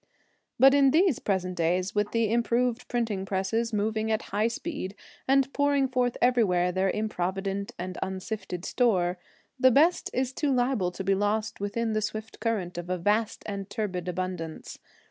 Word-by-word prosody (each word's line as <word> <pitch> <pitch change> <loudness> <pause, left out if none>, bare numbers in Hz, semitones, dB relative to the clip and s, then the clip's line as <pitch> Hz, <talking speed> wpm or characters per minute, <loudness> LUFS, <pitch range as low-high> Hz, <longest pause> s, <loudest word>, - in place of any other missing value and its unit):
But 270 +2 +7
in 280 -1 +5
these 325 - +3
present 185 -2 -1
days, 180 +3 0
with 210 0 0
the 230 -2 +1
improved 235 +1 +1
printing 225 -6 -1
presses 195 +5 -1
moving 220 +1 -1
at 220 - 0
high 210 +2 +2
speed 230 - -5 0.3
and 270 0 +3
pouring 285 -1 +2
forth 250 -1 0
everywhere 195 -8 +3
their 190 +1 +1
improvident 195 -1 -2
and 180 +1 -5
unsifted 190 -1 -4
store, 185 -7 +1 0.4
the 260 - +6
best 315 +8 +3
is 260 0 -1
too 290 0 0
liable 245 -7 +1
to 180 +2 -6
be 195 +1 +2
lost 210 +2 -1
within 220 +3 -1
the 215 - 0
swift 215 +1 -5
current 190 -7 -2
of 175 +1 -7
a 185 - 0
vast 210 +5 0
and 200 -1 -5
turbid 195 -5 -3
abundance. 180 -3 -5
210 Hz, 165 wpm, -27 LUFS, 185-245 Hz, 0.4 s, But